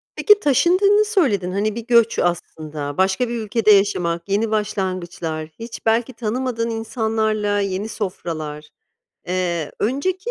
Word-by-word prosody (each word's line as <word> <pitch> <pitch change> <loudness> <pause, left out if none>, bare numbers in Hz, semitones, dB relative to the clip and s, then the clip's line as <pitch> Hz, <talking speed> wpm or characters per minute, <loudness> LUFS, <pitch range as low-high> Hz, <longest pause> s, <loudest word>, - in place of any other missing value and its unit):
Peki 420 -1 +5
taşındığını 385 - +4
söyledin. 255 - +1
Hani, 205 +2 -1
bir 235 -1 -6
göç 235 -2 +4
aslında, 155 -4 -3
başka 190 +6 +1
bir 240 - -3
ülkede 220 -1 +2
yaşamak, 180 -3 +2
yeni 215 +3 +1
başlangıçlar, 185 -7 -2
hiç 230 0 -8
belki 230 +3 +1
tanımadığın 230 +1 -2
insanlarla, 220 -2 -1
yeni 195 +2 -2
sofralar, 155 -7 -5 0.6
eee, 175 -4 -2
önceki 370 - -1
215 Hz, 120 wpm, -21 LUFS, 180-235 Hz, 0.6 s, Peki